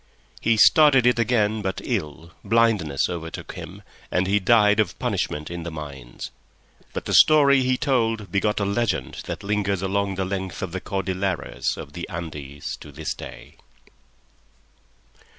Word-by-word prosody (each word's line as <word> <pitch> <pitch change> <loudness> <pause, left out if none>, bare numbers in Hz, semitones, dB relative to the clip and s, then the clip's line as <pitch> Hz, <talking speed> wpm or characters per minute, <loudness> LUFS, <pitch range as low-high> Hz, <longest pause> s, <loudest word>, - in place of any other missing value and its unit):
He 115 -1 +2
started 140 0 +6
it 125 -1 +4
again 110 -2 +1
but 95 -1 -3
ill, 75 +3 -4
blindness 105 -10 +2
overtook 80 -2 -6
him, - - -9 0.3
and 90 +1 +1
he 100 +2 +2
died 105 +1 +4
of 110 - +1
punishment 75 +2 -2
in 85 0 -5
the 85 - -5
mines; 70 -6 -8 0.6
but - - -5
the - - -2
story 140 -3 +6
he 130 0 +1
told 115 -7 0
begot 105 +2 +1
a 100 - 0
legend 100 0 -1
that - - -5
lingers 100 -2 -1
along 100 0 0
the 95 0 -1
length 95 -1 -4
of 95 - -4
the 95 +1 -4
Cordilleras 95 -3 -2
of 70 - -9
the 85 - -6
Andes 75 -5 -6
to - - -12
this - - -4
day. - - -11
100 Hz, 150 wpm, -24 LUFS, 85-115 Hz, 0.6 s, started